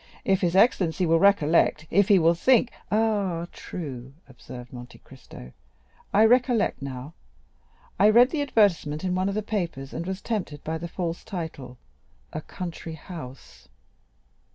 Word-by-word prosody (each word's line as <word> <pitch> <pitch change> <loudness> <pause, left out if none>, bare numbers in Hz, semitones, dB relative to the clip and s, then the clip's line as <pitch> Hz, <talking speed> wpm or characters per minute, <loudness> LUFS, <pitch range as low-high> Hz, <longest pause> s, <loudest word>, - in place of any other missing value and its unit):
If 190 -1 +2
his 175 -1 0
excellency 185 -5 +3
will 165 0 +3
recollect—if 170 0 +3
he 200 - +6
will 165 -1 +4
think——" 245 +7 +3 0.2
"Ah, 205 -6 0
true," 135 -6 -8
observed 125 -1 -11
Monte 125 0 -10
Cristo; 120 - -14 0.6
"I 210 +2 +5
recollect 245 - +2
now. 135 +2 -7 0.9
I 210 - +6
read 240 +4 +6
the 310 - -1
advertisement 190 - +1
in 185 -1 -1
one 185 +2 0
of 200 - -3
the 215 - -1
papers, 170 -11 -4
and 170 - -5
was 190 0 -3
tempted 185 -10 -4
by 160 +1 -3
the 170 - -5
false 170 -1 -4
title, 160 - -7 0.6
'a 155 - -4
country 170 -1 -7
house. 150 -6 -11
170 Hz, 145 wpm, -25 LUFS, 150-205 Hz, 0.9 s, he